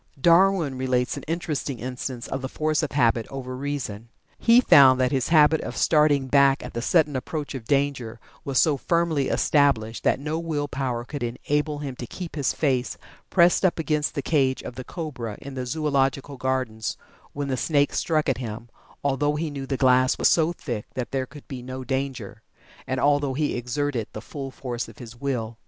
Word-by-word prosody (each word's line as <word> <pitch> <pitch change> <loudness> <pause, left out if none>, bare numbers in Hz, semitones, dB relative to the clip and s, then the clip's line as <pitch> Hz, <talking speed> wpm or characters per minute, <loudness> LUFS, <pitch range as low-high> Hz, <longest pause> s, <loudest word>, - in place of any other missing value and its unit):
Darwin 170 -4 +4
relates 125 -1 0
an - - -6
interesting 155 -5 -3
instance 125 0 -5
of 135 - -4
the 130 - -4
force 155 +1 0
of 155 - -3
habit 115 -4 +2
over 130 -2 -6
the - - -4
reason. 130 -6 -4 0.3
He 235 +1 +6
found 135 - +7
that 130 +1 +2
his 130 -4 0
habit 155 -1 +5
of - - -6
starting 150 -3 +3
back 140 0 +4
at - - -8
the 120 - -3
sudden 150 +1 +2
approach 145 +3 -4
of 130 -5 -7
danger 135 -4 -1 0.2
was 135 -2 -2
so 150 -3 +3
firmly 165 -2 +1
established 125 -7 +2
that - - +2
no 155 +3 -2
will 155 -3 -2
power 130 -4 -3
could 145 +3 -6
enable 145 +5 -1
him 140 -3 -5
to 120 - -6
keep 175 +3 -7
his 145 -4 +1
face 130 -5 0 0.3
pressed 175 0 +4
up 185 - +3
against 155 -2 -1
the 140 - -2
cage 135 -4 +1
of - - -7
the 130 +1 -7
cobra 125 - -6
in 140 - -9
the 130 -1 -4
Zoological 140 -1 0
Gardens 130 -5 -2 0.4
when 145 -1 -3
the 130 - 0
snake 145 +2 +1
struck 155 -2 0
at 135 -3 0
him, 115 -1 -6 0.3
although 145 +1 +1
he 155 0 -2
knew 135 -1 -6
the 135 - -1
glass 130 0 +4
was - - +4
so 165 0 +3
thick 120 -10 -5
that 125 -2 -4
there 130 -1 -1
could 145 +2 -13
be 130 -2 -6
no 130 +1 -6
danger, 130 -6 -4 0.5
and 130 0 -1
although 145 -1 +2
he 150 +1 0
exerted 125 -1 -2
the - - -5
full 135 -2 -7
force 125 -2 -5
of - - -14
his 120 -2 -10
will. 115 -5 -3
135 Hz, 195 wpm, -25 LUFS, 125-150 Hz, 0.5 s, found